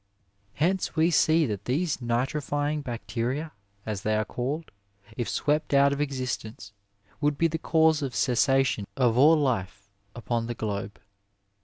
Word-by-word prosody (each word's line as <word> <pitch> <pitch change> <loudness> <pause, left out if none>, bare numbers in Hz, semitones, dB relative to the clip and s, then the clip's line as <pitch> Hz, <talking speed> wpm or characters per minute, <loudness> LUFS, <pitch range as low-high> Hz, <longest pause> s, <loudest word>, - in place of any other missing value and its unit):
Hence 180 +5 0
we 165 +2 +3
see 160 0 +4
that 105 -5 -4
these 150 +5 0
nitrifying 145 +4 -1
bacteria, 125 +5 -3 0.3
as 105 -3 -3
they 110 +1 0
are 110 0 0
called, 140 +8 -4 0.4
if 120 - -3
swept 150 -1 0
out 140 0 +5
of 140 - -2
existence, 125 -7 -4 0.5
would 145 -1 +1
be 165 - +3
the 160 0 -3
cause 160 -1 +3
of 135 -3 -4
cessation 125 -3 +2
of 120 -4 +3
all 150 +6 +6
life 100 -8 -2 0.2
upon 120 -1 -2
the 120 - -4
globe. 105 -2 -4
135 Hz, 145 wpm, -27 LUFS, 115-150 Hz, 0.5 s, all